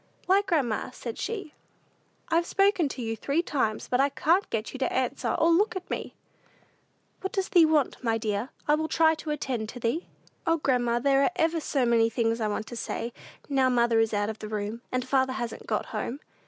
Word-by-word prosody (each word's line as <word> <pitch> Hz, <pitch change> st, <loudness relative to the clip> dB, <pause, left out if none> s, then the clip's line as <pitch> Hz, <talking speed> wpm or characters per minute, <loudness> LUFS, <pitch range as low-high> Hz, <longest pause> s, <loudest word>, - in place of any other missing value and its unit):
"Why, 385 Hz, +2 st, +4 dB
grandma," 300 Hz, -, 0 dB
said 240 Hz, -2 st, -7 dB
she, 395 Hz, -7 st, -4 dB, 0.8 s
"I've 340 Hz, 0 st, +2 dB
spoken 390 Hz, -6 st, +3 dB
to 255 Hz, -, -5 dB
you 225 Hz, 0 st, -2 dB
three 285 Hz, +8 st, 0 dB
times; 250 Hz, -10 st, -1 dB
but 250 Hz, -, +1 dB
I 280 Hz, -, +3 dB
can't 325 Hz, +8 st, +2 dB
get 220 Hz, -1 st, -3 dB
you 265 Hz, -, -6 dB
to 260 Hz, -, 0 dB
answer 260 Hz, +1 st, -1 dB
or 330 Hz, +1 st, +3 dB
look 390 Hz, +6 st, +3 dB
at 370 Hz, -1 st, -5 dB
me." -, -, -4 dB, 1.0 s
"What 385 Hz, -, -4 dB
does 385 Hz, -1 st, -1 dB
thee 340 Hz, -3 st, +6 dB
want, 300 Hz, -5 st, +1 dB
my 225 Hz, -2 st, +1 dB
dear? 215 Hz, +2 st, -2 dB, 0.2 s
I 295 Hz, -, +5 dB
will 315 Hz, +1 st, +1 dB
try 320 Hz, 0 st, +4 dB
to 315 Hz, 0 st, -7 dB
attend 255 Hz, -7 st, -2 dB
to 245 Hz, -, -8 dB
thee." 235 Hz, +9 st, -1 dB, 0.4 s
"O, 330 Hz, 0 st, +4 dB
grandma, 245 Hz, -5 st, +1 dB
there 275 Hz, +2 st, +3 dB
are 280 Hz, -, +3 dB
ever 330 Hz, +1 st, +1 dB
so 275 Hz, -4 st, 0 dB
many 230 Hz, -1 st, +4 dB
things 230 Hz, 0 st, 0 dB
I 215 Hz, -, +1 dB
want 210 Hz, +1 st, -2 dB
to 240 Hz, -, -8 dB
say, 235 Hz, +1 st, -4 dB, 0.3 s
now 270 Hz, -2 st, +3 dB
mother 235 Hz, -2 st, +3 dB
is 225 Hz, -1 st, +2 dB
out 205 Hz, +1 st, 0 dB
of 220 Hz, -, -11 dB
the 215 Hz, -, -7 dB
room, 215 Hz, +2 st, -3 dB
and 255 Hz, 0 st, -1 dB
father 260 Hz, -1 st, +2 dB
hasn't 240 Hz, -3 st, -5 dB
got -, -, -1 dB
home. 265 Hz, +5 st, -4 dB
260 Hz, 210 wpm, -27 LUFS, 230-320 Hz, 1.0 s, thee